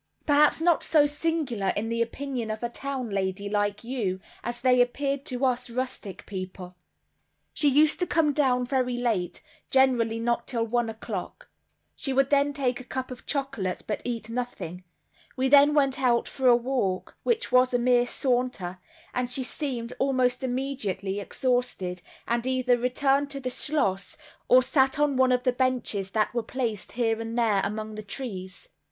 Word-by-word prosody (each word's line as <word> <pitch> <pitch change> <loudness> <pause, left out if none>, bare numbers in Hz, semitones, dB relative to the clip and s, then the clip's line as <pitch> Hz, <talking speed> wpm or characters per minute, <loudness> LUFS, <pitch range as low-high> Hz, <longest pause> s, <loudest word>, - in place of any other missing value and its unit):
Perhaps 295 +1 +4
not 340 -1 +3
so 305 -2 +4
singular 295 -8 -1
in 215 +2 -1
the 230 0 -1
opinion 245 -1 -3
of 215 +2 -4
a 235 - -1
town 260 -2 -4
lady 195 0 -2
like 205 0 -1
you, 225 -7 -2 0.2
as 240 0 -4
they 250 0 +4
appeared 275 +3 -1
to 255 +1 -1
us 250 -1 0
rustic 250 -5 -5
people. 185 -2 -7 0.8
She 295 - +2
used 300 +3 +4
to 360 - 0
come 305 -3 +2
down 255 -4 +2
very 250 -1 0
late, 210 -8 -1 0.3
generally 245 -4 +3
not 235 +1 -1
till 235 -3 0
one 240 0 0
o'clock, 220 -4 -6 0.5
she 270 - -3
would 275 +1 +2
then 285 0 +4
take 260 -4 -1
a - - -8
cup 260 +1 -5
of 250 - -10
chocolate, 270 - -2
but 210 - -3
eat 230 -3 -4
nothing; 200 -7 -5 0.5
we 260 +1 +2
then 285 +2 +6
went 275 -2 +2
out 240 -2 +2
for 265 -1 -1
a 245 - +8
walk, 240 -7 -1
which 465 - 0
was 255 0 +5
a 245 - +2
mere 245 0 +3
saunter, 245 -9 -1 0.3
and 250 -1 -1
she 260 +1 0
seemed, 250 -4 -3
almost 255 -2 +1
immediately, 245 -7 -2
exhausted, 205 -6 -1 0.3
and 235 +1 0
either 255 -1 +2
returned 270 +3 +1
to 275 -1 -4
the 255 -1 -3
schloss 200 -11 0 0.3
or 255 0 +6
sat 265 +1 +2
on 295 -1 +2
one 260 0 +4
of 250 0 +2
the 255 - +2
benches 250 -6 -1
that 215 +3 0
were 240 - 0
placed, 225 -3 -4
here 225 -2 0
and 225 +1 -5
there, 220 -4 +3
among 215 +2 -3
the 215 - -6
trees. 200 -4 -6
250 Hz, 170 wpm, -27 LUFS, 220-270 Hz, 0.8 s, a